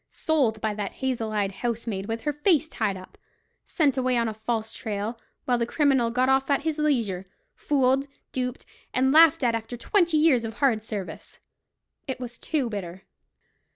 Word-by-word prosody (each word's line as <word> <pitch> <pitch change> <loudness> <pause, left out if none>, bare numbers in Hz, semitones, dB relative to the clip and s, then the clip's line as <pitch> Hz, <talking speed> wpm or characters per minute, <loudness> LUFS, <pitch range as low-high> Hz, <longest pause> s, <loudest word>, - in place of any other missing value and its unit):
Sold 275 - +1
by 220 -1 0
that 205 -1 -4
hazel 245 -4 -2
eyed 205 -2 0
housemaid 225 -2 -3
with 225 0 -3
her 295 - -1
face 315 +1 +2
tied 210 -10 -2
up! 185 - -14 0.5
Sent 285 -6 +1
away 255 -1 +1
on 230 -1 +1
a 220 - -3
false 220 0 -3
trail, 220 +1 -4 0.3
while 245 -1 +1
the 235 - 0
criminal 270 -4 +2
got 250 +2 +1
off 265 +1 +2
at 280 0 +2
his 315 -1 -1
leisure! 225 -11 0 0.3
Fooled, 270 -1 +1 0.2
duped, 250 -1 -3 0.3
and 265 +1 +3
laughed 315 -2 +6
at 235 -2 +3
after 230 +1 -4
twenty 340 - +2
years 300 -6 +4
of 225 0 -5
hard 250 -6 +2
service! 210 -4 -7 0.7
It 265 -1 -3
was 245 -1 -7
too 295 -6 -1
bitter. 190 -4 -6
245 Hz, 175 wpm, -26 LUFS, 220-275 Hz, 0.7 s, laughed